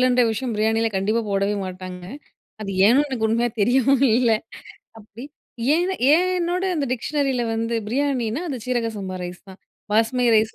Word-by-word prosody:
லன்ற 250 Hz, -1 st, +3 dB
விஷயம் 235 Hz, +2 st, -2 dB
பிரியாணியில 220 Hz, +1 st, +1 dB
கண்டிப்பா 205 Hz, +4 st, +1 dB
போடவே 200 Hz, +1 st, +1 dB
மாட்டாங்க. 185 Hz, -1 st, -7 dB, 0.6 s
அது 205 Hz, -2 st, -4 dB, 0.2 s
ஏன்னு 260 Hz, +7 st, +5 dB
எனக்கு 245 Hz, -5 st, -1 dB
உண்மையா 235 Hz, +2 st, +1 dB
தெரியவும் 260 Hz, +5 st, +3 dB
இல்ல 240 Hz, -3 st, +3 dB, 0.7 s
அப்பிடி 220 Hz, +2 st, -12 dB, 0.5 s
ஏன 360 Hz, +3 st, 0 dB, 0.2 s
ஏன்னோட 360 Hz, +2 st, +1 dB
அந்த 295 Hz, -3 st, -1 dB
டிக்ஷனரி 275 Hz, +3 st, -1 dB
யில 245 Hz, -1 st, 0 dB
வந்து 230 Hz, +1 st, -1 dB
பிரியாணினா 260 Hz, 0 st, -1 dB
அது 275 Hz, -5 st, -3 dB
சீரக 240 Hz, -2 st, 0 dB
சம்பா 190 Hz, -2 st, -5 dB
ரைஸ் 180 Hz, 0 st, -7 dB
தான். 190 Hz, -, -13 dB, 0.3 s
பாஸ்மதி 230 Hz, +3 st, +2 dB
ரைஸ் 220 Hz, 0 st, +2 dB
235 Hz, 155 wpm, -22 LUFS, 215-270 Hz, 0.7 s, ஏன்னு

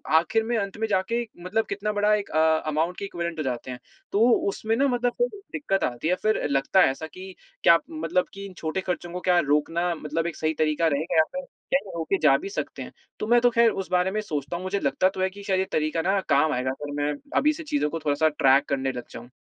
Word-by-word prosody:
आखिर 175 Hz, +7 st, +3 dB
में 235 Hz, +1 st, -1 dB
अंत 200 Hz, -1 st, -3 dB
में 220 Hz, 0 st, -1 dB
जाके 215 Hz, +4 st, 0 dB, 0.2 s
मतलब 220 Hz, +5 st, 0 dB
कितना 205 Hz, +1 st, -2 dB
बड़ा 210 Hz, +1 st, +3 dB
एक 205 Hz, -1 st, -4 dB
अ, -, -, -1 dB, 0.3 s
अमाउंट 160 Hz, +4 st, 0 dB
की 200 Hz, -, -4 dB
इक्विवेलेंट 170 Hz, -3 st, -4 dB
हो -, -, 0 dB
जाते 130 Hz, -1 st, -4 dB
हैं। 125 Hz, -, -7 dB, 0.3 s
तो 215 Hz, +4 st, +4 dB, 0.2 s
उसमें 220 Hz, +3 st, -1 dB
ना, 275 Hz, +4 st, +3 dB
मतलब 245 Hz, -1 st, +1 dB
थोड़ी 485 Hz, -4 st, 0 dB
दिक्कत 195 Hz, -10 st, -1 dB
आती 120 Hz, +4 st, -2 dB
है, 180 Hz, -, +3 dB
फिर 215 Hz, 0 st, +1 dB
लगता 140 Hz, +7 st, +3 dB
है 175 Hz, -, +5 dB
ऐसा 160 Hz, +4 st, -7 dB
कि, 185 Hz, +4 st, -10 dB, 0.3 s
"क्या 170 Hz, -, +7 dB
मतलब 165 Hz, +3 st, 0 dB
कि 195 Hz, 0 st, -8 dB
इन 195 Hz, -, -9 dB
छोटे 160 Hz, +4 st, -2 dB
खर्चों 175 Hz, -2 st, -4 dB
को 180 Hz, -, -3 dB
क्या 180 Hz, -1 st, +5 dB
रोकना 165 Hz, +3 st, +1 dB
मतलब 160 Hz, +2 st, -2 dB
एक 170 Hz, -, -5 dB
सही 155 Hz, 0 st, -1 dB
तरीका 155 Hz, +1 st, +1 dB
रहेगा 155 Hz, +3 st, -1 dB
या 160 Hz, -, +7 dB
फिर, 275 Hz, -, -4 dB, 0.3 s
क्या 275 Hz, -, +4 dB
ये 190 Hz, -, -9 dB
रोके 165 Hz, +4 st, 0 dB
जा 140 Hz, -3 st, +6 dB
भी 195 Hz, -, -6 dB
सकते 200 Hz, -, -5 dB
हैं?" -, -, -7 dB, 0.3 s
तो 215 Hz, -, -3 dB
मैं 240 Hz, +1 st, +5 dB
तो 245 Hz, -, +5 dB
ख़ैर 235 Hz, -1 st, +4 dB
उसे 195 Hz, -2 st, -5 dB
बारे 180 Hz, +1 st, +2 dB
में 215 Hz, +2 st, -1 dB
सोचता 150 Hz, -5 st, -4 dB
हूँ, 180 Hz, -, -7 dB
मुझे 190 Hz, +2 st, -1 dB
लगता 140 Hz, +5 st, +2 dB
तो 190 Hz, -, -6 dB
है 190 Hz, -, +2 dB
कि 200 Hz, +2 st, -12 dB
शायद 190 Hz, -2 st, +1 dB
ये 190 Hz, -, +1 dB
तरीका 155 Hz, +1 st, 0 dB
ना 190 Hz, +4 st, +1 dB
काम 150 Hz, +2 st, +4 dB
आएगा, 125 Hz, +1 st, -1 dB
फिर 145 Hz, 0 st, -5 dB
मैं 150 Hz, 0 st, 0 dB, 0.2 s
अभी 300 Hz, +2 st, +4 dB
से 320 Hz, +1 st, -8 dB
चीज़ों 295 Hz, -, 0 dB
को 165 Hz, -, -4 dB
थोड़ा-सा 150 Hz, +2 st, +3 dB
ट्रैक 135 Hz, -2 st, +4 dB
करने 135 Hz, -1 st, 0 dB
लग 125 Hz, -2 st, -7 dB
जाऊँ। 120 Hz, +1 st, -10 dB
180 Hz, 255 wpm, -25 LUFS, 155-205 Hz, 0.3 s, क्या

